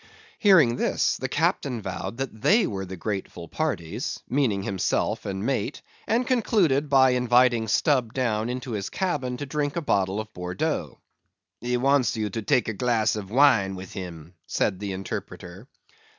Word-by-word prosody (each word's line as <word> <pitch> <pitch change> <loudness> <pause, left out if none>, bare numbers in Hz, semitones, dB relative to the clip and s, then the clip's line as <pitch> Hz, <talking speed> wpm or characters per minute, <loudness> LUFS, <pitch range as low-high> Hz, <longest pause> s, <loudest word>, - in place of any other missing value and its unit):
Hearing 165 - +5
this, - - +1
the - - -4
captain 125 -4 0
vowed 95 +2 -5
that 130 -5 -5
they 220 - +4
were 95 -2 -4
the 95 0 -7
grateful 95 -3 -5
parties 120 - -3
(meaning 120 -8 +1
himself 95 0 -1
and 95 +1 -3
mate) 130 0 -2 0.2
and 235 +3 +1
concluded 185 - +2
by 130 -2 +5
inviting 125 -2 +3
Stubb 125 0 +2
down 115 -3 -1
into 125 0 -4
his 100 -3 -3
cabin 145 -10 -2
to 145 - -5
drink 145 0 -2
a - - 0
bottle 100 - 0
of 110 0 -7
Bordeaux. 90 0 -3 0.6
"He 125 0 -1
wants 135 -1 +2
you 105 -2 -2
to 115 - -3
take 105 +3 +2
a 110 - -1
glass 115 -1 +1
of 100 -3 -6
wine 115 -6 +4
with 95 0 -9
him," 85 -3 -8
said 95 - 0
the 100 -1 -4
interpreter. 95 +1 -7
115 Hz, 165 wpm, -25 LUFS, 95-135 Hz, 0.6 s, Hearing